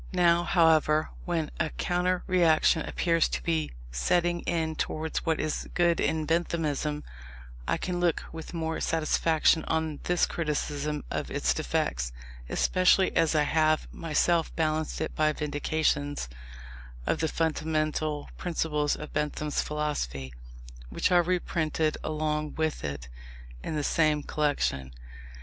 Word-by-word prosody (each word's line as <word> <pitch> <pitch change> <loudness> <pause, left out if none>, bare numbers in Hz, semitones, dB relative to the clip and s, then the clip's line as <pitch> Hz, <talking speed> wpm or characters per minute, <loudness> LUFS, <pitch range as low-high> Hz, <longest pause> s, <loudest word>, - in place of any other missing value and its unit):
Now, 175 -1 +4
however, 160 -3 +3
when 165 -3 -1
a 160 - +1
counter 180 +2 0
reaction 165 -2 +4
appears 165 +1 +1
to - - -3
be 160 -2 0 0.2
setting 175 - +1
in 160 -2 0
towards 160 +2 -3
what 160 -1 +2
is 155 -1 -2
good 175 -1 +3
in 160 -1 +1
Benthamism, 155 -3 -1 0.6
I - - +1
can 180 -1 -3
look 175 -2 +1
with 160 -1 -8
more 160 -1 -2
satisfaction 160 0 +2
on 160 -2 -1
this 180 0 +3
criticism 150 -2 -2
of - - -2
its 60 0 +1
defects, - - -1 0.4
especially 185 +1 +3
as 165 -1 +3
I 150 - +4
have 155 0 +2
myself 165 +1 +1
balanced 155 -1 -1
it - - -2
by 155 0 +2
vindications 145 - -1 0.8
of - - 0
the 160 - +1
fundamental 155 -1 -1
principles 150 -4 0
of 150 - -8
Bentham's 150 0 -1
philosophy, 70 - -3 0.6
which - - 0
are 175 -1 +6
reprinted 160 -3 0
along 150 -1 -2
with 160 -1 -1
it 70 -4 -4 0.6
in 155 - -3
the 150 - -1
same 155 -1 +2
collection. 105 - -1
155 Hz, 130 wpm, -28 LUFS, 150-165 Hz, 0.8 s, are